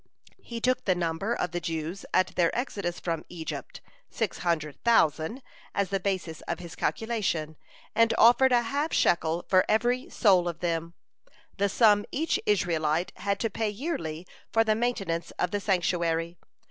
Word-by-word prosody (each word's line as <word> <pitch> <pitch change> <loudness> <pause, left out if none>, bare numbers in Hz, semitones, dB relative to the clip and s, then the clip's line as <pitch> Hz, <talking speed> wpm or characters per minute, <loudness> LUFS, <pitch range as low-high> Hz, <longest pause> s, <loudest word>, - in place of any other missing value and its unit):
He 235 -1 -6
took 255 +2 0
the 185 - +3
number 170 +4 -2
of 180 - -2
the 175 - -2
Jews 165 +2 -4
at 185 0 +3
their 170 -2 +3
exodus 200 -8 -3
from 165 -2 -3
Egypt, 165 -2 -6 0.3
six 225 -3 -3
hundred 155 -5 -2
thousand, 225 - +2 0.3
as 200 -2 0
the 195 0 0
basis 185 -4 -3
of - - -2
his 170 -1 -9
calculation, 195 -9 -1 0.4
and 230 +1 +4
offered 245 +3 +6
a 240 -1 +4
half 285 +7 -1
shekel 170 0 +2
for 185 -1 +5
every 245 +4 +1
soul 185 -6 +3
of 170 -1 -4
them, 170 -1 -2 0.6
the 200 0 +2
sum 205 -1 +4
each 320 +3 0
Israelite 170 -4 +1
had 200 -1 -1
to 225 - +1
pay 220 +1 -1
yearly 190 - -4 0.3
for 225 - +4
the 220 -1 +2
maintenance 195 -8 -1
of 180 - 0
the 205 - 0
sanctuary. 170 -3 0
185 Hz, 160 wpm, -28 LUFS, 170-225 Hz, 0.6 s, offered